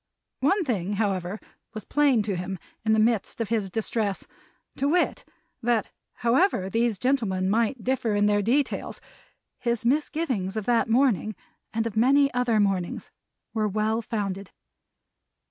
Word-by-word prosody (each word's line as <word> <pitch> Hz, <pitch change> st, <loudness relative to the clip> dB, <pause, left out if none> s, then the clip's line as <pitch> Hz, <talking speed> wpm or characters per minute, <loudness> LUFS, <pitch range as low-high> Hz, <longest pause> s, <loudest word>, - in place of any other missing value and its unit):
One 365 Hz, +7 st, +2 dB
thing, 205 Hz, -7 st, -1 dB
however, 195 Hz, -1 st, -1 dB, 0.4 s
was 215 Hz, -, -6 dB
plain 280 Hz, -7 st, +3 dB
to 200 Hz, -2 st, -2 dB
him, 180 Hz, +2 st, -4 dB, 0.3 s
in 220 Hz, 0 st, +3 dB
the 220 Hz, -, +3 dB
midst 225 Hz, 0 st, +1 dB
of 230 Hz, -, -2 dB
his 215 Hz, -4 st, 0 dB
distress; 215 Hz, -1 st, -1 dB, 0.5 s
to 275 Hz, -, +1 dB
wit, 350 Hz, +3 st, +1 dB, 0.4 s
that 235 Hz, -2 st, +1 dB, 0.3 s
however 235 Hz, -, +2 dB
these 230 Hz, -1 st, +1 dB
gentlemen 210 Hz, -7 st, 0 dB
might 230 Hz, +2 st, +1 dB
differ 240 Hz, -4 st, 0 dB
in 205 Hz, 0 st, +3 dB, 0.2 s
details, 255 Hz, +7 st, 0 dB, 0.6 s
his 235 Hz, -1 st, -1 dB
misgivings 255 Hz, -, 0 dB
of 215 Hz, -, -3 dB
that 235 Hz, -2 st, +2 dB
morning, 225 Hz, -4 st, +2 dB, 0.4 s
and 225 Hz, 0 st, -1 dB
of 225 Hz, -2 st, -4 dB
many 275 Hz, +4 st, +4 dB
other 245 Hz, -3 st, +2 dB
mornings, 195 Hz, -4 st, -1 dB, 0.4 s
were 215 Hz, -2 st, +1 dB
well 215 Hz, +2 st, 0 dB
founded. 200 Hz, -4 st, -3 dB
225 Hz, 140 wpm, -26 LUFS, 205-250 Hz, 0.6 s, many